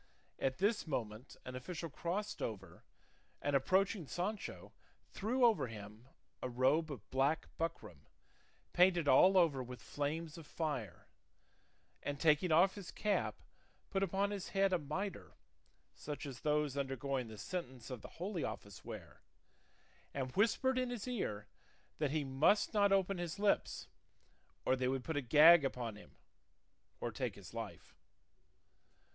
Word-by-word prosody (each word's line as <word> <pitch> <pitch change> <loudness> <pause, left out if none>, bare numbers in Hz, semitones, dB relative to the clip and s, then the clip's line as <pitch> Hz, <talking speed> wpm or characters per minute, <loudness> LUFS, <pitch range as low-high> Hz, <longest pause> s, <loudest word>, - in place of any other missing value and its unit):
At 130 -1 0
this 205 -1 +1
moment 115 -4 -4
an 125 - -6
official 165 +6 -5
crossed 205 +7 -3
over, 95 -6 -5 0.6
and 145 0 0
approaching 185 +4 +2
Sancho 200 +7 -4 0.4
threw 245 +5 +2
over 220 - +3
him 110 +1 -10 0.3
a 130 - -2
robe 140 +6 +2
of 105 -8 -8
black 135 +4 +1
buckram 165 0 -4 0.7
painted 175 -3 +4
all 185 +8 +7
over 160 -7 +4
with 125 0 -7
flames 155 +3 -3
of 155 - -12
fire, 130 - -3 1.0
and 145 0 -4
taking 160 +2 +4
off 175 +5 +5
his 200 -4 -8
cap 210 -1 -1 0.5
put 195 - 0
upon 195 +2 +1
his 200 -3 -4
head 195 -1 +4
a 180 - +3
mitre 175 +7 -5 0.6
such 150 0 -6
as 135 -3 -7
those 150 -2 +1
undergoing 135 -2 -2
the 110 -1 -9
sentence 130 - -5
of 125 -4 -5
the - - -12
Holy 180 -1 -3
Office 100 -1 -6
wear; - - -9 0.9
and 130 -2 -2
whispered 255 +5 +3
in 255 -1 0
his 245 -2 -5
ear 110 - -2 0.5
that 150 -2 +1
he 150 +1 0
must 140 +13 +3
not 200 -2 +4
open 195 -1 +2
his 175 +1 -3
lips, 205 0 +1 0.8
or 130 - +4
they 130 -1 0
would 130 0 -1
put 160 - -3
a 145 - +1
gag 150 +6 +8
upon 120 -5 -2
him, 105 - -15 0.8
or - - -3
take - - -3
his - - -12
life. - - -7
150 Hz, 145 wpm, -36 LUFS, 130-190 Hz, 1.0 s, gag